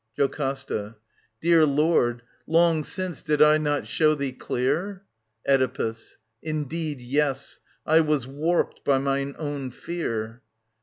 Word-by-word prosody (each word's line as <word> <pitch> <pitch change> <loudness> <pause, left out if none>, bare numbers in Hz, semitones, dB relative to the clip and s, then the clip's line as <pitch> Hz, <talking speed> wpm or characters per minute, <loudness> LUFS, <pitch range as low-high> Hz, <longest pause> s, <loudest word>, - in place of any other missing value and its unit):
JOCASTA. 135 -6 -2 0.5
Dear 165 -1 +5
Lord, 140 -5 +2 0.2
long 165 -1 +3
since 185 +1 -4
did 150 -1 0
I 150 +1 +6
not 145 -1 -1
show 155 -1 +3
thee 140 -2 -2
clear...? 175 +11 -2 0.4
Oedipus. 130 -4 0 0.2
Indeed, 155 -1 -3
yes. 135 +2 -1 0.3
I 160 +1 +5
was 150 -5 +1
warped 155 +6 -1
by 140 -1 +3
mine 140 +1 -1
own 145 -4 -4
fear. 120 -6 -4
145 Hz, 115 wpm, -25 LUFS, 130-155 Hz, 0.5 s, I